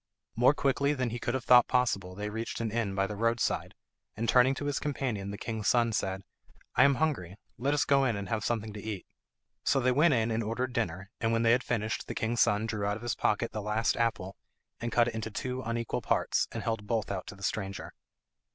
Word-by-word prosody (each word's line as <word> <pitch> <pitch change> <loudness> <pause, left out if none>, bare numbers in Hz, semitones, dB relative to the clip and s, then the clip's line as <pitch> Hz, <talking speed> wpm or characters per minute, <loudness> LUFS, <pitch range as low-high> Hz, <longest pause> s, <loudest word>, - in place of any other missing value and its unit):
More 125 +5 +5
quickly 140 +1 +1
than 130 -3 -1
he 120 - -4
could 120 +2 -2
have 130 -2 -3
thought 125 -1 +7
possible 100 -7 0
they 105 +1 -4
reached 115 +2 -4
an 115 -2 -2
inn 110 -4 -1
by 95 0 +2
the 105 - -5
road 115 +2 +1
side, - - -1 0.4
and 115 +2 -1
turning 130 +2 +5
to 145 - -5
his 145 -1 0
companion 125 -9 -2
the 100 - -5
king's 110 -2 -4
son 120 -2 +3
said, 95 -1 -2 0.5
"I - - +7
am 140 -1 +4
hungry; 125 - -1 0.2
let 140 +4 +1
us 145 - +2
go 140 -1 +4
in 120 -4 +1
and 100 -1 -4
have 110 +1 -2
something 110 -2 -2
to 105 - -7
eat." 105 -4 -5 0.6
So 135 - +3
they 130 0 +2
went 145 +3 +4
in 115 0 +1
and 110 +1 0
ordered 120 +3 -2
dinner, 105 -5 -2
and 115 0 +1
when 115 0 +2
they 115 - +5
had 125 +2 +4
finished 110 -2 -2
the - - -5
king's 115 +1 0
son 105 +1 +3
drew 110 -2 -3
out 100 0 0
of 110 - -12
his 120 - 0
pocket 110 +2 0
the 110 - -4
last 105 +2 +1
apple, 105 -5 -1 0.4
and 120 - -3
cut 120 0 +4
it 120 - -2
into 110 0 -4
two 125 +4 -4
unequal 115 0 -2
parts, - - +1
and - - -5
held 110 -2 -2
both 110 -3 -1
out 95 -2 -4
to - - -8
the 100 - -13
stranger. 100 -1 -3
115 Hz, 240 wpm, -30 LUFS, 105-125 Hz, 0.6 s, thought